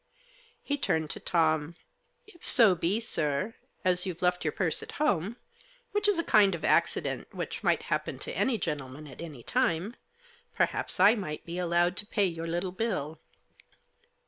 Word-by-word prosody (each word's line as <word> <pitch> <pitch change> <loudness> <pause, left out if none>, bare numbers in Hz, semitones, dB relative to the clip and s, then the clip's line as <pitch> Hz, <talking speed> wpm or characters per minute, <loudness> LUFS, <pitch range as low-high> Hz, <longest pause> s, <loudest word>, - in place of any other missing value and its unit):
He 285 0 -1
turned 160 - 0
to - - -6
Tom. 160 -2 +1 0.3
" - - -44
If 350 -5 -10
so 225 -7 +6
be, 180 +5 0
sir, 165 -3 -1 0.3
as 180 0 +3
youVe 180 0 -5
left 180 0 +2
your 155 - 0
purse 165 -1 -1
at - - -9
home, 205 - 0 0.5
which 415 0 +1
is 410 -3 +3
a 335 - +1
kind 200 - +5
of 160 - -5
accident - - +1
which - - -4
might - - +2
happen - - -2
to - - -6
any 260 -4 +1
gentleman 150 -5 -4
at 135 -1 -11
any 150 -8 -8
time, 175 - 0 0.6
perhaps - - 0
I 200 +4 +8
might 185 -10 -5
be 170 +1 -5
allowed 175 +1 +2
to 205 - -1
pay 205 -2 +2
your 165 -2 -3
little 175 +2 -1
bill." 180 -7 -2
180 Hz, 170 wpm, -29 LUFS, 160-210 Hz, 0.6 s, I